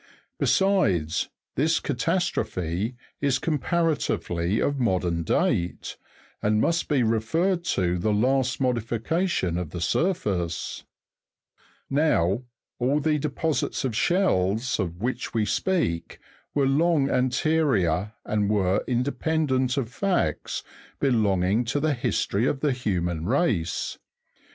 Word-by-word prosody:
Besides, 100 - +2 0.2
this 160 +4 +2
catastrophe 110 - -1 0.3
is 140 -2 +2
comparatively 145 - 0
of 145 -1 0
modern 90 -7 +1
date, 85 +2 0 0.5
and 105 0 +2
must 165 +8 +1
be 140 -5 +2
referred 160 - +1
to 90 - 0
the 110 +5 +1
last 130 +4 +1
modification 120 - 0
of 90 -4 -4
the 85 - -6
surface; 90 - -1 1.0
now, 135 - +2 0.4
all 135 +4 +2
the 150 +1 +1
deposits 150 0 -1
of 120 -4 -2
shells 115 - +1
of 90 0 -3
which 125 -1 -3
we 110 -2 +2
speak 155 - -1 0.4
were, 140 -2 +3
long 145 +1 +3
anterior, 125 - +1
and 105 -1 0
were 95 -3 +2
independent 130 +1 0
of 125 -5 -1
facts 195 -2 -1 0.4
belonging 105 -5 +2
to 135 +5 0
the 155 +1 +1
history 120 -2 0
of 135 - -1
the 150 - +2
human 90 -9 -2
race. 110 - 0
120 Hz, 110 wpm, -25 LUFS, 95-150 Hz, 1.0 s, were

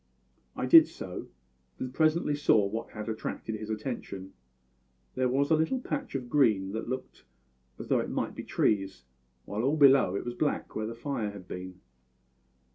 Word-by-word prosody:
"I - - -2
did 330 -2 +9
so; 90 -1 -7 0.5
and 130 0 -5
presently 155 0 +2
saw 115 -8 +4
what 110 +3 -4
had 105 -1 -7
attracted 110 0 -4
his 110 0 -6
attention. 105 -4 -5 0.8
There 130 -1 +1
was 140 +4 +1
a - - +7
little 160 +12 +1
patch 155 - -4
of 130 -2 -3
green 110 -8 +3
that 110 +2 -4
looked 130 - -6 0.5
as - - -8
though - - +3
it - - -3
might - - -2
be - - -7
trees, 95 - 0 0.4
while 105 +2 -3
all 140 +6 +1
below 135 -9 +6
it - - -3
was 120 - -3
black, 145 +4 -2
where 110 0 -2
the 115 - -6
fire 120 -3 -3
had 100 -3 -10
been. 90 0 -8
115 Hz, 175 wpm, -29 LUFS, 105-140 Hz, 0.8 s, did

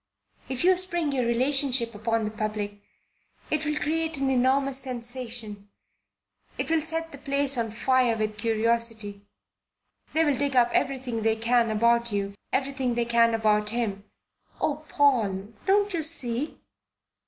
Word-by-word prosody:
If 260 +2 -1
you 370 +1 +5
spring 345 -4 +1
your 255 -3 0
relationship 255 -1 +2
upon 225 +1 -1
the 210 - -3
public, 210 -1 -4 0.7
it 305 0 0
will 300 0 -1
create 320 +1 -1
an 270 -1 0
enormous 265 +1 +2
sensation 240 -5 -5 0.9
it - - -2
will 325 -1 +3
set 325 +1 -3
the 280 - -10
place 280 -1 +1
on 230 -2 -1
fire 245 +1 +2
with 215 -1 -2
curiosity. 225 -2 0 0.9
They'll 315 -3 +3
dig 280 0 -1
up 240 -1 +4
everything 260 -4 -1
they 220 0 +2
can 230 +1 +2
about 235 +2 +2
you 200 -1 -2 0.2
everything 265 -2 -1
they 235 0 0
can 230 -1 +3
about 210 -1 +2
him. 210 -4 -2 0.6
Oh, 300 0 -1
Paul, 220 -8 +1
don't 405 +1 +3
you 335 - 0
see. 285 -3 -2
245 Hz, 140 wpm, -26 LUFS, 225-280 Hz, 0.9 s, you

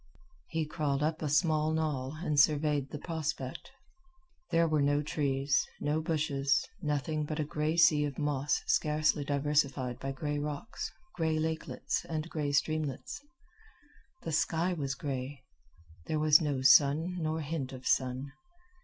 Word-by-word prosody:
He 160 -1 -1
crawled 150 -2 -1
up 160 +1 -1
a 155 - -1
small 155 0 +2
knoll 150 -3 -2
and 150 -5 +1
surveyed 145 -2 +3
the - - -5
prospect. 155 -4 -4 0.8
There 165 0 +3
were 155 -2 +2
no 145 +1 +2
trees, 140 -2 +1 0.2
no 150 +2 0
bushes, 145 -4 0
nothing 150 -1 -1
but 150 +1 -4
a - - +2
gray 150 +2 -1
sea 150 -3 +5
of 140 -3 -5
moss 145 -1 0
scarcely 150 -1 +2
diversified 140 -3 0
by 135 - -3
gray 145 +2 -3
rocks, 150 - -5 0.2
gray 160 -2 0
lakelets, 160 0 -2
and 160 0 -3
gray 150 -2 -1
streamlets. 155 - -1 1.0
The 165 - -3
sky 165 +3 +1
was 140 -5 -2
gray. 135 0 -5 0.6
There 155 - 0
was 155 +1 +6
no 140 -4 -1
sun 150 +6 +5
nor 160 0 -1
hint 145 -3 -3
of 130 -1 -9
sun. 130 +1 0
150 Hz, 145 wpm, -31 LUFS, 140-155 Hz, 1.0 s, was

